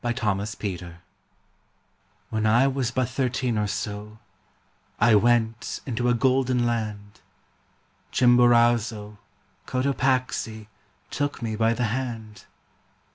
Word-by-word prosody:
J. 120 0 0
TURNER 120 -4 0 0.2
ROMANCE 95 -5 -5 1.4
When 110 -1 0
I 120 +5 +4
was 135 -3 0
but 125 0 -1
thirteen 125 -1 -1
or 105 -1 0
so 105 +1 -5 0.8
I 115 +1 +5
went 115 +1 +2
into 125 -1 -1
a 120 - +3
golden 130 0 +2
land, 105 -3 -4 0.9
Chimborazo, 120 -4 +3 0.5
Cotopaxi 130 -4 -1 0.5
Took 145 -3 -3
me 110 -1 -2
by 115 +1 +2
the 125 - -1
hand. 115 -5 -5
120 Hz, 105 wpm, -25 LUFS, 110-125 Hz, 1.4 s, I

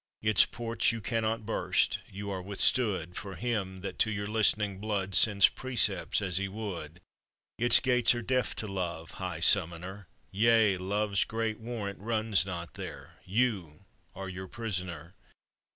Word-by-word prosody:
Its 110 -2 +5
ports 115 -1 -1
you 115 - -4
cannot 115 0 -2
burst 110 - +1
you 100 +1 -6
are 95 -1 -3
withstood 100 -2 +2
For 100 -2 -6
him 105 -6 -3
that 100 - -6
to 110 - +3
your 105 -1 -3
listening 105 -2 +1
blood 100 -2 -2
Sends 100 0 +6
precepts 115 -6 -1
as 90 -3 -2
he 100 +1 -1
would. 90 -6 -7 0.6
Its 120 0 +7
gates 125 -2 +3
are 120 - -4
deaf 130 +2 0
to 110 - -5
Love, 85 -4 -4
high - - -4
summoner; 90 +4 +1 0.2
Yea, 110 -1 +4
Love's 100 +2 0
great 110 -1 -3
warrant 110 -4 -5
runs 110 -3 +1
not 85 -3 -6
there: - - -9
You 100 -6 -1 0.3
are 95 0 -6
your 95 0 -7
prisoner. 95 -6 -5
100 Hz, 150 wpm, -30 LUFS, 95-115 Hz, 0.6 s, Its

